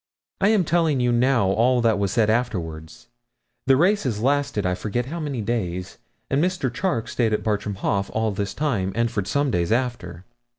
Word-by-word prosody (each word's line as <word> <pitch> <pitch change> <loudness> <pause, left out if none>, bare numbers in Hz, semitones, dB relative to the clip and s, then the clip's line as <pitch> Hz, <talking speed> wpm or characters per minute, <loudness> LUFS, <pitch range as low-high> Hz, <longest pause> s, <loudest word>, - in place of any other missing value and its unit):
I 195 - +3
am 210 -3 +4
telling 160 -4 +1
you 125 0 +2
now 120 -4 +2
all 120 +5 +3
that 110 -3 +2
was 100 -2 0
said 110 0 +2
afterwards. 85 -6 -3 0.6
The 135 -1 +5
races 165 - +2
lasted 135 -4 0
I 90 - +1
forget 110 +6 -2
how 165 +6 -5
many 145 -6 -3
days, 95 -5 -3 0.3
and 140 +3 +1
Mr. 175 -9 -1
Charke 145 -6 -1
stayed 115 -3 0
at 105 - -1
Bartram 105 -1 -1
Haugh 100 +1 -1
all 110 0 0
this 100 0 -3
time 115 -11 -1
and 115 0 +1
for 100 -5 -1
some 140 +7 0
days 85 -1 0
after. 115 -8 -2
115 Hz, 185 wpm, -23 LUFS, 100-135 Hz, 0.6 s, The